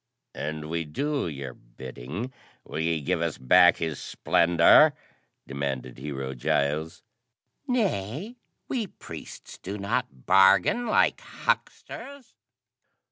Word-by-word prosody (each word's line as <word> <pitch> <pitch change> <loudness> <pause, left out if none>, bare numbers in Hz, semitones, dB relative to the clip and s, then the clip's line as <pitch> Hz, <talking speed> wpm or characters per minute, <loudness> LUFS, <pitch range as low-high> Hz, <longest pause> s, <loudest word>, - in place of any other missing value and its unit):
"And 75 0 -5
we 85 +1 -2
do 140 - -2
your 70 -5 -6
bidding, 65 - -8 0.3
will - - -6
ye 80 -1 0
give 70 - -1
us - - -1
back 90 +8 +6
His 80 -4 -3
Splendor?" 85 - +5 0.5
demanded 65 -3 -4
Hero 65 -1 -5
Giles. 75 +5 -1 0.6
"Nay 195 - -1 0.3
we 235 -6 -2
priests - - -11
do 100 +3 -6
not 85 -9 -3
bargain 95 - +5
like 215 - +2
hucksters." 280 -3 -4
80 Hz, 105 wpm, -26 LUFS, -, 0.6 s, back